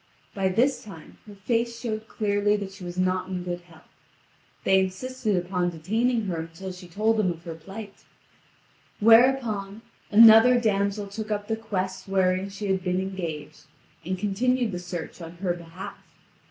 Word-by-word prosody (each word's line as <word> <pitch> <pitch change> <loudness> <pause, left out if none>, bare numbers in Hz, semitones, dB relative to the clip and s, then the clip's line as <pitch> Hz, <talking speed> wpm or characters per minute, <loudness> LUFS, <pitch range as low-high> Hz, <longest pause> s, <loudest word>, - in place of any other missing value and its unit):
By 195 -1 0
this 250 +8 +1
time 190 -7 -12
her 205 - -11
face 235 +3 -1
showed 220 -2 -4
clearly 205 -1 +1
that 200 -2 -4
she 195 -1 -12
was 175 0 -7
not 185 0 0
in 180 -1 -3
good 175 0 -4
health. 170 -2 -19 0.8
They 190 0 +4
insisted 215 +4 -1
upon 180 0 0
detaining 220 +8 0
her 175 -4 -2
until 165 +4 -7
she 180 0 -11
told 215 +6 +1
them 210 -4 +2
of 165 0 -9
her 170 - -6
plight; 195 +6 -10 1.0
whereupon, 225 -3 +4 0.3
another 225 +3 +8
damsel 200 -2 0
took 215 +2 -6
up 205 -1 -2
the 220 - 0
quest 190 -4 -4
wherein 190 0 +1
she 200 +1 -6
had 190 -2 0
been 180 0 0
engaged, 160 -6 -5 0.4
and 185 +3 -2
continued 235 +4 +1
the 180 - -4
search 175 -1 -6
on 165 0 -8
her 175 0 -1
behalf. 170 +1 -9
195 Hz, 165 wpm, -26 LUFS, 180-220 Hz, 1.0 s, another